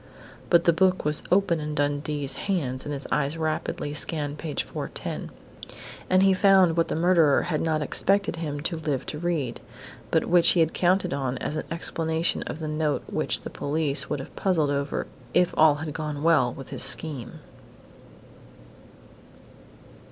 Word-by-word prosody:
_ - - -20
But 170 -1 +5
the 170 - +4
book 185 +1 +2
was 150 0 +1
open 185 -3 +3
in 150 0 -4
Dundee's 145 -1 -1 0.2
hands 130 -9 -1
and 145 - -4
his 140 -1 -3
eyes 150 +2 0
rapidly 155 -2 -2
scanned 150 -1 -2
page 155 -3 -3
410. - - -5 0.8
And 185 +1 +4
he 195 0 +5
found 190 -3 +5
what 165 -1 +2
the - - -2
murderer 165 -4 +4
had 155 -3 -1
not 155 -2 0
expected 195 +4 0
him 145 -3 -4
to 165 +2 -2
live 150 -4 -2
to 150 - -5
read, 155 -8 -2 0.5
but - - +2
which 175 -1 +5
he 175 - +1
had 165 -1 +2
counted 180 -3 +1
on 135 -2 -2
as 150 - -4
an - - -3
explanation 165 0 -1
of - - -5
the 160 -1 -5
note 155 -1 -1
which - - -1
the - - -8
police 145 -1 0
would - - -2
have 135 - -9
puzzled 160 -7 +1
over, 140 0 -2 0.3
if 180 0 +3
all 155 -2 +6
had 155 0 -5
gone 150 -2 -4
well 160 -7 +4
with 135 0 -10
his 135 - -5
scheme.... 135 0 0
155 Hz, 170 wpm, -25 LUFS, 145-170 Hz, 0.8 s, all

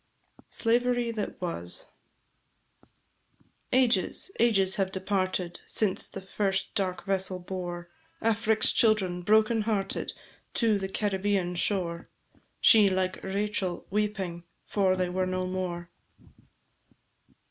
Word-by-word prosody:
The - - -30
Ouse. - - -11
SLAVERY 240 0 +2
THAT 215 -3 -4
WAS. 90 - -3 1.9
Ages, 250 - +2
ages 195 -5 +3
have 190 -1 0
departed, 185 -2 -1
Since 205 -4 +1
the 195 - -7
first 195 0 -1
dark 190 -3 -2
vessel 190 -1 0
bore 175 -1 -6 0.3
Afric's 220 0 +2
children, 195 -6 +2
broken 220 +3 +3
hearted, 205 -3 -1 0.4
To 220 -4 +2
the 190 0 -3
Caribbéan 195 -3 0
shore; 170 -2 -1 0.5
She, 215 -4 +7
like 185 0 -1
Rachel, 195 -2 -2
Weeping, 195 -5 -2 0.2
for 190 -2 +2
they 185 -1 0
were 185 +1 0
no 185 0 -1
more. 180 -2 -4
195 Hz, 110 wpm, -28 LUFS, 185-210 Hz, 1.9 s, She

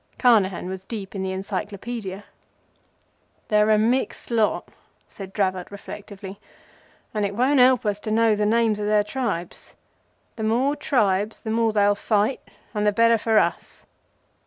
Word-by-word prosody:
Carnehan 205 -8 +3
was 190 0 -6
deep 200 -2 -7
in 195 - -4
the 190 - -2
Encyclopædia. 200 +1 -5 1.3
"They're 210 -1 +3
a 215 - +5
mixed 240 +3 0
lot," 225 -2 +1 0.4
said 195 -2 -10
Dravot, 185 -3 -1
reflectively; 200 -1 -9 0.7
"and 210 -1 -1
it 200 0 -2
won't 260 +4 +3
help 250 -2 +5
us 205 -1 0
to 215 - -6
know 220 0 +3
the 210 0 0
names 225 -1 +2
of 210 - -2
their 210 0 +3
tribes. 210 -7 -4 0.6
The 220 - -4
more 250 +6 +1
tribes 210 -7 0
the 220 - -4
more 225 0 +2
they'll 205 -1 +3
fight, 210 +4 0 0.3
and 210 -1 -1
the 210 - +3
better 230 +2 +4
for 220 0 +1
us. - - -1
210 Hz, 155 wpm, -23 LUFS, 200-230 Hz, 1.3 s, a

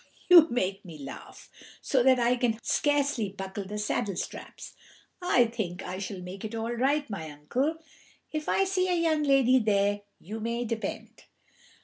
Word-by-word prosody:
you 340 -3 +9
make 195 -5 -1
me 165 -4 -10
laugh 140 -2 -10 0.3
so 265 - +1
that 260 +1 +5
I 240 0 +3
can 240 -3 0
scarcely 285 -7 +1
buckle 195 0 -6
the 210 +2 -5
saddle 205 -2 -1
straps. - - -7 0.5
I 255 -9 +4
think 205 -6 -4
I 185 +1 -5
shall 195 -1 -5
make 185 +2 -8
it 220 +1 -5
all 225 +1 -2
right, 280 +5 +1
my 165 -7 -6
uncle, 245 - -1 0.6
if 310 0 -3
I 390 - +3
see 370 -1 0
a 360 - +2
young 320 -2 +2
lady 270 -3 +4
there, 205 -2 +1 0.2
you 215 +6 -7
may 235 +2 -2
depend." 230 -1 -5
230 Hz, 165 wpm, -28 LUFS, 195-275 Hz, 0.6 s, you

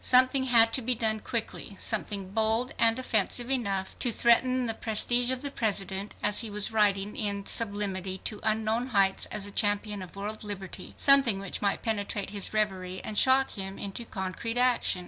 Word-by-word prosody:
Something 255 +1 +5
had 230 -3 +5
to 260 - +2
be 250 +1 0
done 220 -1 +2
quickly, 220 -2 -5
something 200 -3 -2
bold 225 +3 0
and 230 0 +3
offensive 240 0 -1
enough 200 -7 -1
to 250 - +1
threaten 250 +3 +3
the 225 - -1
prestige 240 +3 +1
of 260 +1 -2
the 285 - -1
President, 200 -4 -2
as 205 0 +3
he 225 - -5
was 205 +2 -3
riding 205 -2 +1
in 200 -2 -3
sublimity 200 -4 0
to 210 - -4
unknown 220 +3 0
heights 195 -5 +1
as 210 -1 -3
a 205 - -4
champion 205 0 0
of 185 0 -10
world 210 +2 -5
liberty; 195 -3 -7
something 275 -7 +5
which 195 -2 -5
might 200 -1 -1
penetrate 205 -2 -3
his 200 -2 -4
reverie 190 -4 -2
and 215 - -4
shock 265 +4 +4
him 195 -1 -5
into 200 +4 -6
concrete 220 +3 -5
action. 250 -6 +2
215 Hz, 180 wpm, -28 LUFS, 200-235 Hz, -, Something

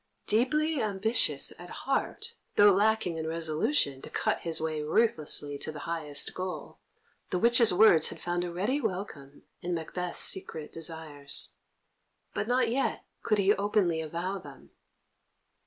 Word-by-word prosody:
Deeply 285 +7 +2
ambitious 205 - +2
at 175 0 -10 0.2
heart, 430 - -2 0.2
though 205 0 +7
lacking 205 -3 +1
in 160 0 -3
resolution 160 - 0
to - - -9
cut - - 0
his 165 -1 -2
way 155 -1 -2
ruthlessly 150 -5 0
to - - -3
the 150 -1 -8
highest 155 -4 -4
goal, 185 0 -6 0.5
the 180 - 0
witches' 235 +3 +5
words 180 -4 +6
had - - -6
found 175 0 -2
a 175 - -4
ready 210 +12 -1
welcome 180 - -5 0.2
in 175 -1 -2
Macbeth's 175 +2 -3
secret 160 -5 -2
desires. 160 -3 -2 0.8
But 205 - -2
not 250 0 +2
yet 265 +3 -1 0.2
could 215 - +1
he 200 0 +4
openly 200 -5 +1
avow 170 +5 -4
them. - - -14
180 Hz, 140 wpm, -29 LUFS, 160-220 Hz, 0.8 s, though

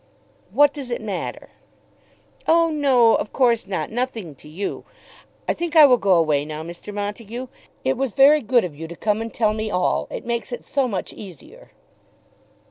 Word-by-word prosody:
"What 290 0 +4
does 275 -4 -7
it 240 - -2
matter?" 205 -4 -5 1.0
"Oh 330 0 +4
no; 265 -6 +4
of - - -1
course 235 -6 +2
not; 195 +2 -3
nothing 230 - -3
to 140 - -15
you. 185 +6 -5 0.6
I - - +2
think 340 -1 -4
I 310 -2 +10
will 250 -3 +5
go 195 -2 +3
away 155 -4 +2
now, 155 +1 -6
Mr. 170 +5 -9
Montague. 210 +4 -5 0.4
It 265 0 +1
was 265 -2 -1
very 285 +6 +6
good 240 -2 +2
of 160 -5 -7
you 165 +2 -7
to 170 - -9
come 210 +4 -1
and 225 0 -5
tell 215 -2 +1
me 215 0 -3
all. 180 -3 0
It - - -7
makes 235 -2 -3
it 240 - -6
so 275 -2 0
much 195 -6 -4
easier." 215 - -13
225 Hz, 185 wpm, -22 LUFS, 195-265 Hz, 1.0 s, I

